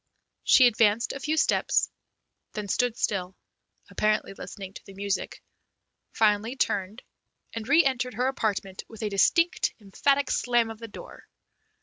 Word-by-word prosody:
She 255 - +6
advanced 225 -1 +3
a 275 - -6
few 305 +3 -1
steps, 320 - +2 0.6
then 210 -1 -5
stood 245 +4 0
still, 185 -2 -2 0.6
apparently 215 -2 0
listening 195 -1 -9
to - - -11
the 195 - -12
music, 200 0 -3 0.7
finally 215 +3 +1
turned, 205 -2 -2 0.5
and 225 +1 -6
re 320 +4 +6
entered 250 -2 -1
her 250 +3 0
apartment 205 -7 -2
with 225 -1 -10
a 210 - -1
distinct, 335 - +2
emphatic 275 +7 0
slam 240 -2 +1
of 220 - -10
the 230 - -7
door. 205 - -12
220 Hz, 140 wpm, -26 LUFS, 200-250 Hz, 0.7 s, She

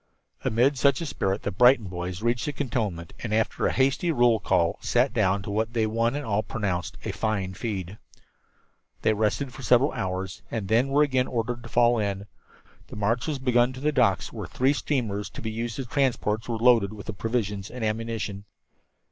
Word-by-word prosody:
Amid 130 +5 +2
such 140 +2 +4
a 170 - -3
spirit 100 -8 -2
the 100 - -1
Brighton 125 +3 +5
boys 90 +2 -5
reached 120 +3 +1
the 145 - -2
cantonment 110 - -3
and 115 - -5
after 110 +1 +1
a - - +1
hasty 135 +6 +2
roll 120 -6 +4
call 85 -4 +1
sat 125 +3 +2
down 100 -4 +1
to 100 - -5
what 110 +2 -1
they 115 -2 +2
one 115 +3 0
and 145 -1 -3
all 105 -1 +1
pronounced 95 -7 -3
a - - -1
"fine 100 -4 -2
feed." 100 -2 -5 1.0
They 110 - +4
rested 110 +5 -1
for 135 - -9
several 125 +3 +4
hours 95 -5 -4
and 110 -4 -3
then 115 +6 +3
were 140 +2 +4
again 130 -3 +1
ordered 120 0 -2
to - - -10
fall 120 -1 +3
in. 100 -1 -2 0.6
The - - -10
march 110 +5 0
was 150 -3 -1
begun 125 -1 +2
to 130 - -8
the 150 +3 +1
docks, 120 -9 +1
where - - -5
three 130 +3 +2
steamers 115 -9 -2
to - - -9
be 110 - -4
used 115 +1 -4
as 135 - -3
transports 120 -4 0
were 115 - -1
being 115 - -3
loaded 115 -5 +5
with 105 -1 -7
provisions 105 -4 -2
and 125 -3 -4
ammunition. 110 -2 -3
115 Hz, 200 wpm, -26 LUFS, 100-125 Hz, 1.0 s, Brighton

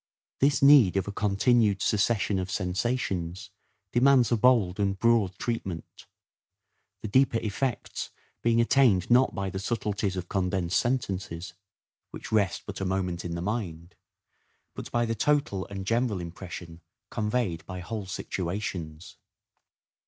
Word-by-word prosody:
This 140 0 +2
need 135 -10 +7
of 95 - -1
a - - -3
continued 105 +1 +2
succession 105 -1 +1
of 90 0 -4
sensations 95 -2 -2 0.4
demands 125 -1 +4
a - - +4
bold 110 -5 +3
and 100 -1 0
broad 110 -4 +2
treatment; 95 -8 -5 1.0
the - - -2
deeper 130 +2 +3
effects 115 +4 -3 0.3
being 115 0 +2
attained 115 -6 +3
not 125 +2 +4
by 100 -1 -3
the 95 - -4
subtleties 105 -2 -2
of 90 -1 -4
condensed 90 -2 0
sentences, 95 -8 -3 0.6
which - - -9
rest 100 -6 +1
but - - -7
a - - 0
moment 90 -2 -2
in 85 -1 -4
the 85 - -4
mind, 90 -5 -4 0.8
but - - -7
by 120 0 +1
the 115 - -1
total 115 -5 0
and 95 -1 -6
general 115 -2 0
impression 85 -1 -8 0.3
conveyed 105 -6 -1
by 90 - -6
whole 100 +2 -5
situations. 90 -4 -5
100 Hz, 135 wpm, -27 LUFS, 90-115 Hz, 1.0 s, need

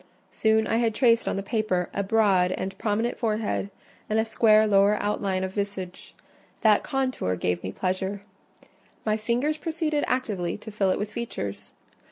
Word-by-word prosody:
Soon 220 0 +2
I 225 - +1
had 230 -2 +1
traced 230 -2 +3
on - - 0
the 195 - -3
paper 195 -4 0
a - - 0
broad 195 -3 +3
and 190 +1 -4
prominent 225 +3 -1
forehead 215 -3 -1 0.4
and 215 - +1
a 220 - +2
square 220 -1 +4
lower 200 0 +4
outline 200 -2 -1
of 190 0 -4
visage: 200 -3 -5 0.5
that 215 -2 +5
contour 255 - -1
gave 90 -1 -1
me 95 - -4
pleasure; 190 - -2 0.8
my 215 -1 +2
fingers 240 +8 0
proceeded 310 -2 -1
actively 205 -9 -1
to 215 +1 -10
fill 200 -2 +1
it - - +1
with 210 +1 -4
features. 100 - -5
210 Hz, 165 wpm, -26 LUFS, 190-225 Hz, 0.8 s, that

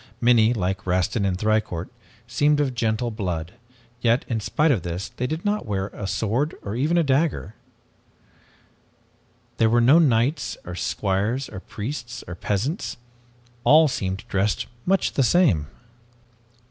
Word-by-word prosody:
Many, 120 -2 +4
like 95 -3 -2
Rastin 100 +3 +1
and 90 -1 -1
Thicourt, 105 -4 -1 0.4
seemed 145 +5 +2
of 140 -3 +1
gentle 115 0 -1
blood, 90 -6 -4 0.5
yet, 120 +1 +2
in 115 -2 -1
spite 150 +8 +1
of 115 -10 +1
this, 85 +2 -4
they 125 - -3
did 160 +6 -4
not 205 - -1
wear 100 -1 -2
a 100 - -5
sword 120 +10 -1
or 100 +2 -4
even 150 +8 +1
a 170 - +4
dagger. 140 - 0 2.0
There 110 -1 +4
were 120 +2 +4
no 130 +8 +6
knights 140 0 +1
or 90 - -6
squires, 105 +8 -1
or - - -7
priests 120 +4 -6
or 85 - -6
peasants. 105 - -2 0.7
All 155 +4 +6
seemed 95 -7 -3
dressed 100 -1 0 0.2
much 195 +1 +2
the - - +1
same. 130 - +3
115 Hz, 145 wpm, -24 LUFS, 95-140 Hz, 2.0 s, no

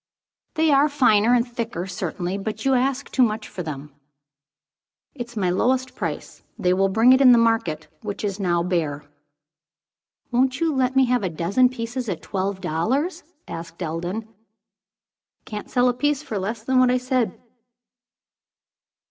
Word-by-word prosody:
"They 315 -1 +3
are 285 +2 +4
finer 240 -5 +4
and 240 +1 +1
thicker 230 -7 -4
certainly. 180 0 -4
But 220 +3 -5
you 270 - +3
ask 260 +1 0
too 260 - +1
much 220 -2 +1
for 185 - -7
them." 150 -3 -7 1.2
"It's 240 -3 -8
my 185 -3 +1
lowest 255 +6 +1
price. - - -5 0.2
They 180 0 +2
will 195 +1 +2
bring 225 +6 +5
it 260 - +4
in 255 -2 +8
the - - +6
market, 225 -10 +1
which 210 -2 -5
is 200 -1 -2
now 175 -3 +1
bare." 160 -5 -2 1.3
"Won't 255 +2 +1
you 330 -2 +1
let 260 0 +1
me 265 0 +5
have 250 -1 +1
a 190 - -1
dozen 185 +10 +2
pieces 240 -1 -4
at 180 - -4
twelve 190 0 -3
dollars?" 260 - -1 0.3
asked 170 +2 -7
Eldon. 175 +7 -4 1.2
"Can't 210 -1 -7
sell 250 0 +3
a 250 - +3
piece 290 +3 0
for 210 -7 -4
less 215 +3 -4
than 260 +2 +2
what 255 -1 +5
I 250 - +3
said." 255 -2 -1
225 Hz, 160 wpm, -23 LUFS, 185-255 Hz, 1.3 s, in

